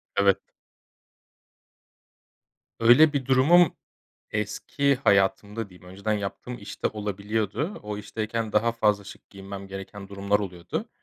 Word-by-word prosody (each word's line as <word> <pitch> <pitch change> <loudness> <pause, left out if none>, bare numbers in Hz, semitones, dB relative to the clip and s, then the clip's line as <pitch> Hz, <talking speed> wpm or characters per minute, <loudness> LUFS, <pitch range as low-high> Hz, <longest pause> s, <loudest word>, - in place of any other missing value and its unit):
Evet. 100 -1 +4 2.4
Öyle 135 +7 +7
bir 140 -3 -1
durumum 145 +6 +5 0.6
eski 135 +7 0
hayatımda 100 -1 +1
diyeyim, 90 -1 -16
önceden 100 +3 -2
yaptığım 105 +4 -4
iş 105 -3 -10
de - - +5
olabiliyordu. 105 - -3
O 105 0 -4
işteyken 110 +1 -3
daha 115 +2 +3
fazla 105 -3 +1
şık - - -13
giyinmem 100 0 -8
gereken 95 +1 -8
durumlar 100 +1 0
oluyordu. 90 -4 -5
105 Hz, 115 wpm, -26 LUFS, 100-115 Hz, 2.4 s, Öyle